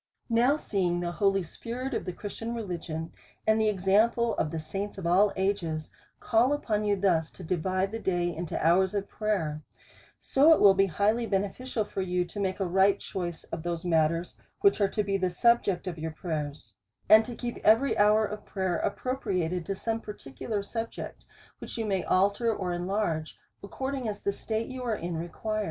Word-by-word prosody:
Now 245 Hz, +6 st, +4 dB
seeing 180 Hz, -, 0 dB
the 175 Hz, 0 st, -2 dB
holy 195 Hz, +1 st, +2 dB
spirit 245 Hz, -, -5 dB
of -, -, -2 dB
the 180 Hz, -, -2 dB
Christian 225 Hz, +5 st, -6 dB
Reli 195 Hz, -7 st, -4 dB
gion, 160 Hz, 0 st, -5 dB, 0.3 s
and 220 Hz, 0 st, +3 dB
the 215 Hz, -, +3 dB
example 215 Hz, +4 st, +2 dB
of 155 Hz, -, 0 dB
the 160 Hz, -, -4 dB
saints 195 Hz, +6 st, -5 dB
of 190 Hz, -, -6 dB
all 190 Hz, +4 st, +4 dB
ages, 180 Hz, -5 st, -1 dB, 0.3 s
call 245 Hz, +4 st, +3 dB
upon 215 Hz, -7 st, -1 dB
you 205 Hz, -1 st, +3 dB
thus 180 Hz, -5 st, +1 dB
to 185 Hz, -, -11 dB
divide 185 Hz, +3 st, -1 dB
the 225 Hz, -, -4 dB
day 175 Hz, -4 st, 0 dB
into 170 Hz, 0 st, -4 dB
hours 185 Hz, +4 st, +4 dB
of 200 Hz, 0 st, -1 dB
prayer; 175 Hz, -9 st, -2 dB, 0.6 s
so 295 Hz, +4 st, +5 dB
it -, -, +3 dB
will 200 Hz, -1 st, +8 dB
be 195 Hz, 0 st, +3 dB
highly 215 Hz, +7 st, +1 dB
beneficial 210 Hz, +4 st, -1 dB
to 195 Hz, -, -4 dB
you, 180 Hz, -1 st, 0 dB
to 205 Hz, -, -8 dB
make 190 Hz, -1 st, -1 dB
a 195 Hz, -, 0 dB
right 190 Hz, +2 st, +3 dB
choice 175 Hz, -3 st, -5 dB
of -, -, -4 dB
those 170 Hz, 0 st, -3 dB
matters 165 Hz, 0 st, +1 dB, 0.2 s
which 400 Hz, -, +4 dB
are 200 Hz, -, +4 dB
to 210 Hz, -, -1 dB
be 195 Hz, 0 st, 0 dB
the 185 Hz, -1 st, 0 dB
subject 200 Hz, -2 st, +2 dB
of 175 Hz, -3 st, -5 dB
your 160 Hz, +1 st, -3 dB
prayers, 150 Hz, -, -5 dB, 0.3 s
and 215 Hz, +2 st, +8 dB
to 240 Hz, -, -7 dB
keep 240 Hz, 0 st, -4 dB
every 225 Hz, +6 st, +4 dB
hour 210 Hz, +1 st, +4 dB
of 210 Hz, 0 st, -6 dB
prayer 190 Hz, -3 st, -2 dB
ap -, -, 0 dB
propriated 185 Hz, -10 st, -2 dB
to 195 Hz, -, -1 dB
some 225 Hz, +3 st, -2 dB
particular 205 Hz, -, -5 dB
subject, 225 Hz, +2 st, -6 dB, 0.3 s
which -, -, -7 dB
you 225 Hz, -, -1 dB
may 195 Hz, -3 st, 0 dB
alter 200 Hz, +5 st, +2 dB
or 185 Hz, -4 st, -2 dB
enlarge, 175 Hz, -3 st, -2 dB, 0.3 s
according 265 Hz, +4 st, -4 dB
as 205 Hz, -, -6 dB
the 200 Hz, -, 0 dB
state 220 Hz, +2 st, -3 dB
you 260 Hz, +1 st, -7 dB
are 235 Hz, -3 st, -1 dB
in 170 Hz, -3 st, -4 dB
re 165 Hz, +2 st, -3 dB
quires. 215 Hz, +5 st, -3 dB
195 Hz, 195 wpm, -28 LUFS, 175-220 Hz, 0.6 s, will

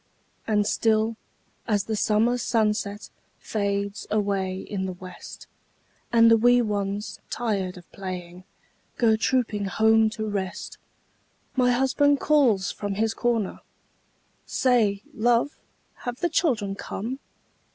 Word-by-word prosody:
And 210 Hz, -2 st, +2 dB
still, 220 Hz, +1 st, +1 dB, 0.5 s
as 205 Hz, -3 st, +1 dB
the 220 Hz, +1 st, -3 dB
summer 225 Hz, +4 st, +2 dB
sunset 210 Hz, -3 st, -1 dB, 0.3 s
Fades 200 Hz, -1 st, -2 dB
away 200 Hz, -3 st, 0 dB
in 190 Hz, -1 st, -4 dB
the 185 Hz, -, -4 dB
west, 180 Hz, 0 st, -11 dB, 0.7 s
And 230 Hz, -1 st, +6 dB
the 230 Hz, -, +7 dB
wee 245 Hz, +2 st, +5 dB
ones, 205 Hz, -2 st, -2 dB
tired 195 Hz, -6 st, -2 dB
of 175 Hz, -, -15 dB
playing, 180 Hz, -2 st, -7 dB, 0.5 s
Go 225 Hz, -2 st, +4 dB
trooping 220 Hz, -3 st, 0 dB
home 220 Hz, +3 st, +4 dB
to 215 Hz, 0 st, -2 dB
rest, 200 Hz, -1 st, -4 dB, 0.8 s
My 250 Hz, -2 st, +3 dB
husband 270 Hz, +3 st, +3 dB
calls 245 Hz, -11 st, +3 dB
from 205 Hz, -1 st, -4 dB
his 220 Hz, +2 st, 0 dB
corner, 230 Hz, -5 st, -1 dB, 0.8 s
"Say, 215 Hz, -6 st, +1 dB
love, 240 Hz, +5 st, +1 dB, 0.4 s
have 245 Hz, 0 st, -5 dB
the 345 Hz, -, +1 dB
children 225 Hz, -, +1 dB
come?" 230 Hz, +6 st, -5 dB
215 Hz, 120 wpm, -25 LUFS, 200-235 Hz, 0.8 s, the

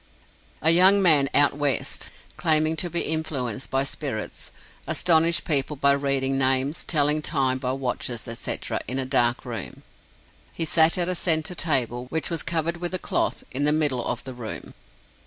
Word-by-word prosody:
A 160 Hz, -, +7 dB
young 185 Hz, +4 st, +6 dB
man 155 Hz, -7 st, +4 dB
"out 145 Hz, -1 st, +4 dB
West," 145 Hz, -2 st, -1 dB, 0.3 s
claiming 155 Hz, 0 st, +2 dB
to 175 Hz, +2 st, +1 dB
be 170 Hz, +1 st, -1 dB
influenced 135 Hz, -6 st, -3 dB
by 135 Hz, 0 st, +1 dB
spirits, 140 Hz, -, -5 dB, 0.4 s
astonished 165 Hz, -1 st, +3 dB
people 150 Hz, -1 st, 0 dB
by 140 Hz, 0 st, +3 dB
reading 135 Hz, -1 st, 0 dB
names, 135 Hz, +3 st, +1 dB
telling 150 Hz, -1 st, +1 dB
time 130 Hz, -3 st, 0 dB
by 130 Hz, -1 st, -2 dB
watches, 125 Hz, -3 st, -4 dB
etc., 115 Hz, 0 st, -3 dB
in 130 Hz, +4 st, -3 dB
a 135 Hz, -, 0 dB
dark 120 Hz, -1 st, +1 dB
room. 115 Hz, -5 st, -7 dB, 0.7 s
He 165 Hz, -, -2 dB
sat 160 Hz, +2 st, +4 dB
at 175 Hz, -1 st, 0 dB
a 185 Hz, -, 0 dB
centre 160 Hz, -1 st, +1 dB
table, 125 Hz, -8 st, -1 dB
which 160 Hz, +5 st, -2 dB
was 165 Hz, -3 st, -1 dB
covered 170 Hz, 0 st, -2 dB
with 175 Hz, +1 st, -3 dB
a -, -, +1 dB
cloth, -, -, -2 dB
in 135 Hz, +3 st, -2 dB
the 150 Hz, -, +3 dB
middle 145 Hz, -5 st, 0 dB
of 120 Hz, -1 st, -4 dB
the 130 Hz, 0 st, -8 dB
room. 120 Hz, -3 st, -8 dB
145 Hz, 170 wpm, -24 LUFS, 130-160 Hz, 0.7 s, A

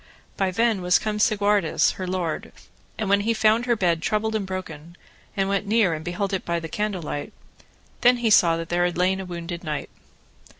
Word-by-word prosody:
By 195 Hz, -1 st, 0 dB
then 225 Hz, +1 st, +1 dB
was 180 Hz, 0 st, +4 dB
come 210 Hz, -1 st, -3 dB
Segwarides, 205 Hz, -4 st, +2 dB
her 185 Hz, -, -6 dB
lord, 180 Hz, -4 st, -3 dB, 0.5 s
and 215 Hz, -, -2 dB
when 200 Hz, +1 st, +4 dB
he 225 Hz, +2 st, 0 dB
found 220 Hz, +3 st, +3 dB
her 240 Hz, -, +3 dB
bed 175 Hz, -5 st, +1 dB
troubled 215 Hz, +4 st, 0 dB
and 210 Hz, -3 st, -2 dB
broken, 170 Hz, -3 st, -7 dB, 0.4 s
and 195 Hz, 0 st, +1 dB
went 200 Hz, 0 st, -1 dB
near 210 Hz, -5 st, +3 dB
and 155 Hz, 0 st, -5 dB
beheld 185 Hz, +4 st, -3 dB
it 190 Hz, -, -1 dB
by 170 Hz, 0 st, -1 dB
candle 185 Hz, +3 st, -3 dB
light, 145 Hz, -1 st, -5 dB, 0.7 s
then 245 Hz, +1 st, +5 dB
he 235 Hz, -2 st, 0 dB
saw 165 Hz, -5 st, +5 dB
that 165 Hz, 0 st, -6 dB
there 175 Hz, 0 st, +1 dB
had 175 Hz, -1 st, -2 dB
lain 185 Hz, +2 st, +2 dB
a 190 Hz, -, -5 dB
wounded 170 Hz, -1 st, -6 dB
knight. 150 Hz, -3 st, -4 dB
190 Hz, 200 wpm, -24 LUFS, 170-210 Hz, 0.7 s, then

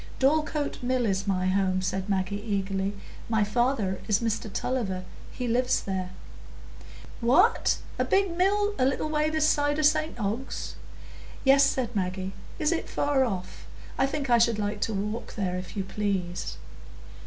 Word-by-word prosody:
"Dorlcote 300 Hz, +1 st, +1 dB
Mill 250 Hz, 0 st, +1 dB
is 195 Hz, -1 st, 0 dB
my 185 Hz, -2 st, +1 dB
home," 185 Hz, 0 st, +2 dB
said 190 Hz, +1 st, -2 dB
Maggie, 195 Hz, +1 st, -1 dB
eagerly. 195 Hz, -2 st, -1 dB, 0.4 s
"My 220 Hz, -2 st, +3 dB
father 210 Hz, -3 st, 0 dB
is 210 Hz, -2 st, +3 dB
Mr 225 Hz, -2 st, -2 dB
Tulliver; 195 Hz, -7 st, -2 dB, 0.3 s
he 250 Hz, -, -4 dB
lives 250 Hz, +2 st, +2 dB
there." 190 Hz, -2 st, -3 dB, 1.1 s
"What! 355 Hz, -, +4 dB, 0.2 s
a -, -, +4 dB
big 390 Hz, -3 st, +2 dB
mill 410 Hz, +3 st, +2 dB
a 255 Hz, -, +4 dB
little 275 Hz, +3 st, 0 dB
way 305 Hz, 0 st, +1 dB
this 310 Hz, -1 st, +2 dB
side 290 Hz, -1 st, +2 dB
o' 310 Hz, -, 0 dB
St 305 Hz, -2 st, +2 dB
Ogg's?" 220 Hz, +5 st, -3 dB, 0.7 s
"Yes," 275 Hz, +1 st, +6 dB
said 250 Hz, -4 st, 0 dB
Maggie. 190 Hz, 0 st, -2 dB, 0.2 s
"Is 305 Hz, +1 st, +1 dB
it 335 Hz, -, -2 dB
far 285 Hz, -2 st, +2 dB
off? 185 Hz, -6 st, -5 dB, 0.3 s
I 270 Hz, -, +2 dB
think 280 Hz, 0 st, -3 dB
I 240 Hz, -1 st, +5 dB
should 230 Hz, -1 st, +3 dB
like 205 Hz, 0 st, -2 dB
to 225 Hz, -, 0 dB
walk 210 Hz, +4 st, -4 dB
there, 185 Hz, -4 st, -1 dB
if 185 Hz, +3 st, -6 dB
you 195 Hz, -, 0 dB
please." 185 Hz, -, -2 dB
225 Hz, 160 wpm, -27 LUFS, 195-275 Hz, 1.1 s, Yes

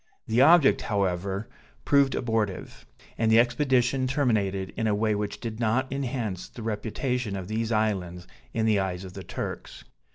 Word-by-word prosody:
The 115 Hz, +3 st, +2 dB
object, 155 Hz, 0 st, +6 dB
however, 100 Hz, 0 st, -1 dB, 0.4 s
proved 140 Hz, -1 st, +4 dB
abortive; 110 Hz, -5 st, -2 dB, 0.3 s
and 110 Hz, -1 st, +2 dB
the 110 Hz, -, +7 dB
expedition 125 Hz, +1 st, +2 dB
terminated 105 Hz, -9 st, 0 dB
in 110 Hz, -, -1 dB
a 105 Hz, -, +2 dB
way 110 Hz, +1 st, +1 dB
which 105 Hz, 0 st, -3 dB
did 115 Hz, -2 st, -6 dB
not 125 Hz, +4 st, 0 dB
enhance 120 Hz, -8 st, -3 dB
the 115 Hz, -, -10 dB
reputation 110 Hz, +1 st, -2 dB
of 95 Hz, -2 st, -5 dB
these 110 Hz, +2 st, -2 dB
islands 95 Hz, -5 st, -1 dB, 0.3 s
in 110 Hz, -, 0 dB
the 110 Hz, -2 st, +3 dB
eyes 95 Hz, -1 st, -2 dB
of 95 Hz, -1 st, -9 dB
the 95 Hz, -, -7 dB
Turks. -, -, -6 dB
110 Hz, 160 wpm, -26 LUFS, 100-125 Hz, 0.4 s, the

